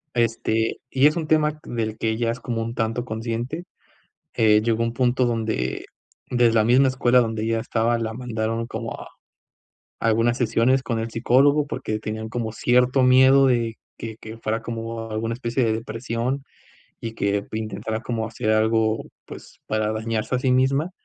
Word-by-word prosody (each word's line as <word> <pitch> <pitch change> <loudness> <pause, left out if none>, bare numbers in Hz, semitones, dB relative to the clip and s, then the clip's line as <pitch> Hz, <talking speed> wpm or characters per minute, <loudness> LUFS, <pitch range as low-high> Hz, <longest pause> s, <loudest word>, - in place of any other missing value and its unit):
Este, 115 -1 0
y 135 +2 +3
es 150 - +1
un 165 - -2
tema 155 0 +2
del 110 -2 -3
que 110 - -1
ella 115 +1 0
es 120 - -6
como 115 -2 -3
un 115 +1 -4
tanto 115 +2 -1
consciente, 115 +7 -4 0.7
eh, 105 -1 +4
llegó 115 0 +1
un 115 0 -2
punto 125 0 +2
donde 110 - -2 0.4
de 120 -2 +3
la 110 - +4
misma 130 +3 +5
escuela 125 -1 +3
donde 110 -1 -2
ella 115 0 0
estaba, 115 +1 0
la 110 -1 -3
mandaron 115 -1 -3
como 115 0 -5
a - - -9 0.9
algunas 115 +2 +2
sesiones 125 +2 +2
con 115 -2 -2
el 115 +1 -3
psicólogo 140 +6 +3
porque 110 -5 -3
tenían 110 +1 -5
como 115 -2 -3
cierto 125 +3 +3
miedo 130 +2 +6
de 115 -3 +1 0.2
que 110 -1 -6
que 110 0 -9
fuera 110 0 -2
como 115 0 -5
alguna 115 +1 -2
especie 120 +1 -1
de 110 - +1
depresión, 115 +4 -3 0.6
y 115 -1 -5
que 100 -1 -1
intentara 110 0 -3
como 115 -2 -2
hacer 110 -1 -2
algo, 110 0 +2 0.2
pues - - -12
para 110 0 0
dañarse 110 +1 -2
a - - +2
sí 130 - +1
misma. 135 +6 +2
115 Hz, 170 wpm, -23 LUFS, 110-125 Hz, 0.9 s, miedo